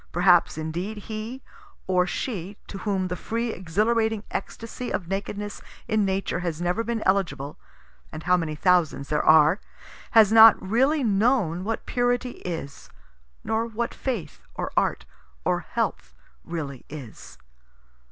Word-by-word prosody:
Perhaps 175 -1 +4
indeed 175 +7 -4
he 220 +5 -6 0.4
or 180 -1 +2
she 200 -5 -4
to 195 - -8
whom 190 -2 -1
the 180 - -3
free 230 +4 -2
exhilarating 220 +5 0
extasy 230 +4 -5
of 175 - -2
nakedness 205 +2 -4 0.3
in 220 -2 +2
Nature 190 -2 -1
has 170 -3 -3
never 180 +6 0
been 230 -1 -2
eligible 150 -8 0 0.5
(and 155 0 -7
how 180 +1 +4
many 165 -3 -2
thousands 170 -5 +2
there 150 - +1
are!) 155 +4 +6 0.5
has 220 -2 +6
not 225 0 +9
really 265 +10 +2
known 200 -5 +2
what 225 +2 -3
purity 245 0 -1
is 160 -5 -6 0.5
nor 220 +1 0
what 235 +1 -3
faith 240 -10 -4
or - - -3
art - - +1 0.4
or - - +2
health 65 0 -3 0.3
really 145 -6 -5
is. 135 -7 -10
195 Hz, 135 wpm, -25 LUFS, 170-225 Hz, 0.5 s, not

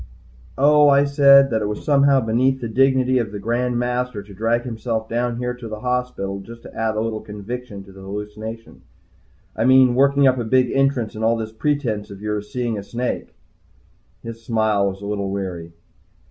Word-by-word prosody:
"Oh," 145 +2 +5
I 140 0 +5
said. 140 -1 +6
"That 110 -1 0
it 105 - -1
was 105 0 -5
somehow 140 -2 +4
beneath 125 +4 +1
the 120 - -4
dignity 130 +1 +2
of 115 -4 -3
the 105 - -5
Grand 120 +4 -1
Master 125 -3 -2
to 100 0 -14
drag 115 +4 0
himself 115 -2 -3
down 120 +1 -2
here 125 0 -2
to 120 -1 -9
the 110 -1 -7
hospital 125 -6 -2
just 115 +4 -12
to - - -12
add 110 -1 -1
a 110 - 0
little 110 -1 -3
conviction 105 0 -7
to 100 - -15
the 95 0 -13
hallucination. 105 +3 -8 0.7
I 115 - 0
mean, 130 -1 +6
working 140 +2 +3
up 130 -1 +3
a - - -1
big 125 +2 +2
entrance, 135 -4 +1
and 110 - -6
all 115 +1 +2
this 110 -1 -5
pretense 110 -4 -2
of 100 - -10
your 105 0 -2
seeing 115 0 -3
a - - -8
snake." 120 +4 -4 0.9
His 115 0 -8
smile 110 -3 +1
was 95 +1 -9
a - - -7
little 100 -1 -3
weary. 90 -4 -5
115 Hz, 195 wpm, -21 LUFS, 105-125 Hz, 0.9 s, said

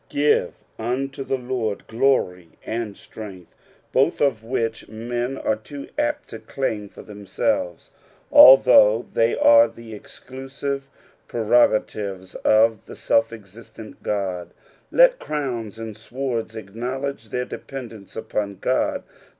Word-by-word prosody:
" - - -40
Oive 145 0 +2 0.3
URte 135 +4 -3
the 135 - 0
Lord 120 -5 -3
glory 110 -9 0
and 110 -3 -4
strength," 95 -6 -11 0.4
both - - +2
of 125 -6 +1
which 115 -2 -3
men 120 +4 -4
are 110 - 0
too 140 +6 -10
apt 295 0 -2
to - - -8
claim 110 -7 -3
for - - -13
them 105 -1 -12
selves, 90 -2 -1 0.4
although 125 -4 +8
the; 115 +1 +2
are 115 0 +7
the 115 0 -12
exclusive 135 +5 -7 0.4
prerogatives 105 -5 +1
of 110 0 +2
the - - -9
scK 115 0 +2
exiatent 110 +1 -12
Ood. 95 -4 -3 0.4
Let - - +5
crowns 120 -8 -4
and 110 -2 -7
swords 115 0 -4
acknowledge 120 +4 -5
their 125 +4 -2
dependence 115 -9 -9
upon 100 -3 -3
God. 130 +5 0
115 Hz, 125 wpm, -22 LUFS, 105-130 Hz, 0.4 s, although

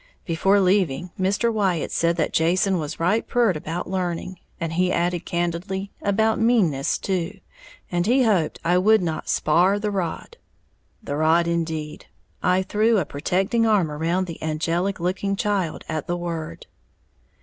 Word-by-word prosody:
Before 195 +4 +2
leaving, 185 -3 +1
Mr. 205 +5 +1
Wyatt 190 -6 0
said 170 0 +1
that 160 -3 -1
Jason 180 +3 +2
was 155 0 -5
right 185 +7 +1
pyeert 235 -7 +2
about 165 +3 -4
learning, 180 -1 -3 0.2
and, 165 -1 -3
he 180 +2 +1
added 175 -1 -1
candidly, 175 +3 -2
about 220 +2 +1
meanness 195 - +2
too, 190 +1 -3 0.5
and 175 +1 0
he 255 +3 +4
hoped 195 -9 +1
I 175 +2 +3
would 215 +1 +4
not 160 -2 -3
spar' 180 +6 +3
the 210 0 -2
rod. 185 -5 -4 0.7
The 145 - -3
rod 160 +2 +3
indeed, 160 -3 -3 0.3
I 185 +1 +2
threw 215 +4 +2
a 185 - +1
protecting 190 +11 0
arm 195 -8 +2
around 165 +5 -1
the 165 -3 -8
angelic 165 +5 -1
looking 185 +3 -1
child 195 -5 -1
at 155 -2 -4
the 175 - -1
word. 165 - -5
180 Hz, 150 wpm, -23 LUFS, 165-200 Hz, 0.7 s, he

